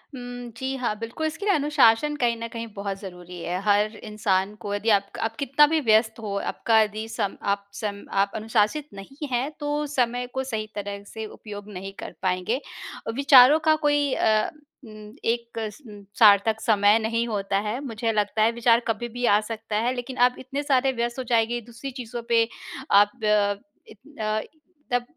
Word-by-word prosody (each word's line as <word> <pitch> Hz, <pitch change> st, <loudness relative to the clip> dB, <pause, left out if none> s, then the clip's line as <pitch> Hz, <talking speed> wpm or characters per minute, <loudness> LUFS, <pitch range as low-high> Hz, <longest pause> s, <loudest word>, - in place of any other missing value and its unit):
उम, 245 Hz, -1 st, -7 dB
जी 265 Hz, 0 st, -3 dB
हाँ, 240 Hz, -4 st, -1 dB
बिल्कुल, 230 Hz, +8 st, -3 dB
इसके 325 Hz, +6 st, -5 dB
लिए 405 Hz, -, +4 dB
अनुशासन 295 Hz, -2 st, +3 dB
कहीं 235 Hz, -1 st, +2 dB
न 230 Hz, 0 st, -5 dB
कहीं 230 Hz, 0 st, -5 dB
बहुत 200 Hz, -1 st, -4 dB
ज़रूरी 180 Hz, -2 st, -9 dB
है 175 Hz, +2 st, -2 dB
हर 210 Hz, +1 st, +2 dB
इंसान 205 Hz, -2 st, 0 dB
को 205 Hz, -, -4 dB
यदि 210 Hz, +3 st, -1 dB
आप 200 Hz, -2 st, +4 dB
क -, -, -7 dB
आप 225 Hz, 0 st, -2 dB
कितना 280 Hz, +1 st, +5 dB
भी 320 Hz, -, +4 dB
व्यस्त 220 Hz, -2 st, +3 dB
हो 210 Hz, -3 st, -4 dB
आपका 225 Hz, +2 st, +1 dB
यदि 215 Hz, +1 st, -2 dB
सम 200 Hz, -3 st, -2 dB, 0.2 s
आप 200 Hz, 0 st, -2 dB, 0.2 s
सम 200 Hz, -2 st, -4 dB, 0.2 s
आप 200 Hz, 0 st, 0 dB
अनुशासित 220 Hz, +6 st, 0 dB
नहीं 275 Hz, +10 st, -8 dB
हैं 250 Hz, +3 st, 0 dB
तो 295 Hz, 0 st, -1 dB
समय 245 Hz, -3 st, 0 dB
को 265 Hz, -, -1 dB
सही 220 Hz, -5 st, -4 dB
तरह 200 Hz, -1 st, -5 dB
से 220 Hz, +1 st, -6 dB
उपयोग 210 Hz, -1 st, -9 dB
नहीं 195 Hz, +1 st, -6 dB
कर -, -, -7 dB
पाएँगे। 185 Hz, +6 st, 0 dB, 0.5 s
अ, -, -, 0 dB
विचारों 275 Hz, +1 st, +7 dB
का 310 Hz, -, +6 dB
कोई 290 Hz, -2 st, +2 dB
अ, 215 Hz, -1 st, +2 dB, 0.4 s
उम, 215 Hz, -1 st, -12 dB
एक 235 Hz, 0 st, -2 dB, 0.3 s
उम, 205 Hz, -1 st, -11 dB, 0.2 s
सार्थक 220 Hz, 0 st, +6 dB
समय 210 Hz, 0 st, +4 dB
नहीं 230 Hz, +1 st, -1 dB
होता 200 Hz, -3 st, -1 dB
है 235 Hz, +4 st, -2 dB
मुझे 225 Hz, -2 st, -2 dB
लगता 210 Hz, 0 st, 0 dB
है 225 Hz, -, +4 dB
विचार 235 Hz, 0 st, +3 dB
कभी 225 Hz, +1 st, -1 dB
भी 245 Hz, -, 0 dB
आ 205 Hz, -2 st, +5 dB
सकता 220 Hz, -1 st, -5 dB
है 250 Hz, -, +1 dB
लेकिन 250 Hz, +1 st, -6 dB
आप 250 Hz, -, -17 dB
इतने 270 Hz, +3 st, -4 dB
सारे 270 Hz, -2 st, +2 dB
व्यस्त 235 Hz, +2 st, -2 dB
हो -, -, -2 dB
जाएँगे 230 Hz, +1 st, +2 dB
दूसरी 240 Hz, +4 st, -8 dB
चीज़ों 240 Hz, 0 st, -6 dB
पे 230 Hz, -1 st, +4 dB, 0.4 s
आप 205 Hz, +1 st, +6 dB
अ, 205 Hz, -1 st, +2 dB, 0.3 s
इ -, -, -11 dB, 0.3 s
अ, 215 Hz, 0 st, 0 dB, 0.5 s
तब 245 Hz, 0 st, +2 dB
225 Hz, 190 wpm, -25 LUFS, 210-245 Hz, 0.5 s, विचारों